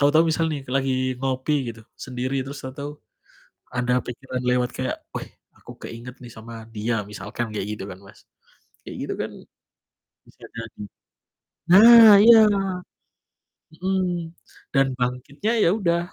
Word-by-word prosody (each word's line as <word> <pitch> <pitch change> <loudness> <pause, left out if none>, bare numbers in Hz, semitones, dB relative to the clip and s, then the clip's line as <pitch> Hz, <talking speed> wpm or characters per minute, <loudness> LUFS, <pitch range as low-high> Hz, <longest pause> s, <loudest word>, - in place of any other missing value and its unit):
tahu-tahu 150 +3 +4
misal 160 +1 +1
nih 145 -3 -4
lagi 130 -1 0
ngopi 130 0 -1
gitu 115 - -15
sendiri, 130 +1 -3
terus 140 +2 -8
tahu-tahu 145 +2 -7 0.7
ada 125 0 0
pikiran 125 +1 -6
lewat 125 0 +1
kayak, - - -3 0.2
"Weh, - - -5 0.3
aku - - -13 0.2
keinget 120 +2 -10
nih 120 -2 -11
sama 115 0 -10
dia." 110 0 -2
Misalkan 105 +2 -6
kayak 105 -1 -3
gitu - - -7
kan, 90 -1 -9
Mas. 100 0 -18 0.6
Kayak - - -9
gitu - - -3
kan - - -3 1.0
bisa - - -20
jadi 115 -2 -8 0.9
nah 225 +3 +9
iya! 230 +1 +9 1.4
Mhm. 190 +1 0 0.7
Dan 135 -1 +4
bangkitnya 125 - -2
ya - - +4
udah, 170 -5 +1
130 Hz, 135 wpm, -23 LUFS, 120-150 Hz, 1.4 s, nah